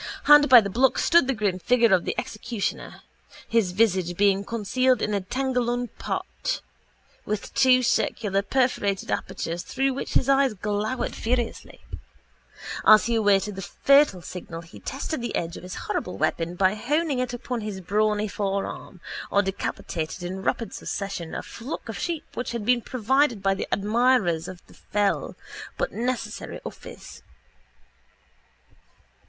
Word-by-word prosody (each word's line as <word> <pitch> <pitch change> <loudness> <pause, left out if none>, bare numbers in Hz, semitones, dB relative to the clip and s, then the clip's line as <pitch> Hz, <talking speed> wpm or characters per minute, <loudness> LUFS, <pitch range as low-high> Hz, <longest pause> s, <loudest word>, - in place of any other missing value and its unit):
Hard 295 -1 +7
by 250 -2 +10
the 200 - -3
block 255 +5 +3
stood 340 -6 +4
the 270 - 0
grim 200 -4 -1
figure 235 +1 +3
of 180 - +3
the - - -2
executioner, 220 -1 -4 0.4
his 225 -6 +2
visage 185 -4 +1
being 200 -1 +3
concealed 245 +4 +1
in 210 - -1
a 200 - 0
tengallon 245 +1 -1
pot - - -3 0.6
with 210 -1 -4
two 255 -1 +5
circular 205 -4 +1
perforated 205 -4 0
apertures 170 +1 -3
through 270 +6 -1
which 270 - -5
his - - +3
eyes 270 -4 +3
glowered 210 +5 -2
furiously. 235 0 -3 1.0
As 215 0 +7
he 235 - 0
awaited 205 -2 +2
the 195 - -6
fatal 275 -3 +3
signal 165 +1 -7
he 165 +5 -13
tested 275 +1 -4
the 235 -2 -3
edge 170 0 -2
of - - -8
his 185 +1 -7
horrible 180 - -3
weapon 170 +1 -1
by 190 +1 +3
honing 285 +5 0
it 255 -1 -1
upon 245 0 -4
his 210 -2 -5
brawny 210 +3 +1
forearm 195 -2 -4 0.3
or 200 - +3
decapitated 180 -3 -4
in 185 +2 -4
rapid 230 +3 -2
succession 195 -5 -5
a - - -4
flock 235 +4 -7
of 225 - -6
sheep 335 -3 -2
which 245 -1 -4
had 230 -3 -4
been 245 +1 +3
provided 255 -1 +1
by 195 0 +3
the 195 - -4
admirers 210 -5 +2
of 180 -1 -9
his - - -18
fell 205 -1 0 0.4
but - - -1
necessary 245 +1 -3
office. - - -10
215 Hz, 150 wpm, -25 LUFS, 195-250 Hz, 1.0 s, by